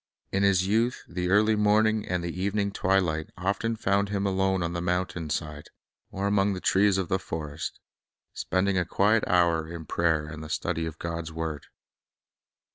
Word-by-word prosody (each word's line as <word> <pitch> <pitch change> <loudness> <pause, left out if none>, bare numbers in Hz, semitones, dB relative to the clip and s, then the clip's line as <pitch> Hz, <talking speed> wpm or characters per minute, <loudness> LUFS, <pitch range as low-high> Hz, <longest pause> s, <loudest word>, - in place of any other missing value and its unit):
In 100 - +1
His 95 -2 +3
youth 115 +5 +1
the 90 +1 -3
early 105 +3 +4
morning 105 +1 +2
and 90 -1 -1
the 85 +1 -4
evening 100 +1 0
twi 95 0 +2
light 80 -4 -1
often 100 +5 -1
found 100 -2 +1
Him 100 -1 -1
alone 95 -1 +1
on 85 0 -2
the 85 - -2
mountainside 85 -4 -2 0.4
or 95 +1 -3
among 100 0 +2
the 95 - -4
trees 95 +1 +3
of 95 -2 -1
the 95 - 0
forest, 75 -4 -5 0.5
spending 95 0 0
a - - +2
quiet 105 +5 +2
hour 85 -3 +2
in 85 -1 -7
prayer 80 -1 +1
and 75 0 -8
the 80 - -8
study 80 0 -2
of 80 0 -7
God's 85 -1 -4
word. 80 -3 -5
95 Hz, 175 wpm, -27 LUFS, 85-100 Hz, 0.5 s, early